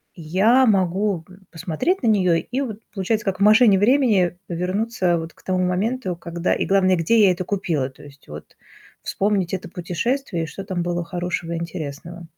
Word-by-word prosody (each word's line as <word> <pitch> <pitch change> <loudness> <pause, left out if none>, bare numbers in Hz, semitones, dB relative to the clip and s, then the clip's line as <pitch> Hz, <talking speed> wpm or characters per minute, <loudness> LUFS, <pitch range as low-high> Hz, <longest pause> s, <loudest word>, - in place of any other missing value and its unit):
я 195 +11 +3
могу 190 -2 +1
г 185 +1 -16
посмотреть 175 - -2
на - - +2
неё 190 -5 +3
и 250 +10 -2
вот, 225 -6 -5
получается, 215 +2 -1
как 190 -2 -2
в 200 - +2
машине 215 -2 +6
времени 205 -7 +3
вернуться 185 +1 -1
вот 165 0 -6
к - - -23
тому 185 -1 0
моменту, 190 +2 -1
когда 170 +1 -2
и - - -1
главное, 190 -1 +3
где 180 +7 +2
я 185 - +5
это 180 +1 -3
купила. 170 -9 -2
То 135 - -17
есть 140 -1 -16
вот 75 +1 -11 0.5
вспомнить 195 -3 -1
это 185 - -7
путешествие, 180 - -2
и - - -3
что 195 +6 -8
там 185 -3 -3
было 175 0 -2
хорошего 175 -1 -4
и - - -2
интересного. 170 0 -7
185 Hz, 185 wpm, -22 LUFS, 170-210 Hz, 0.5 s, машине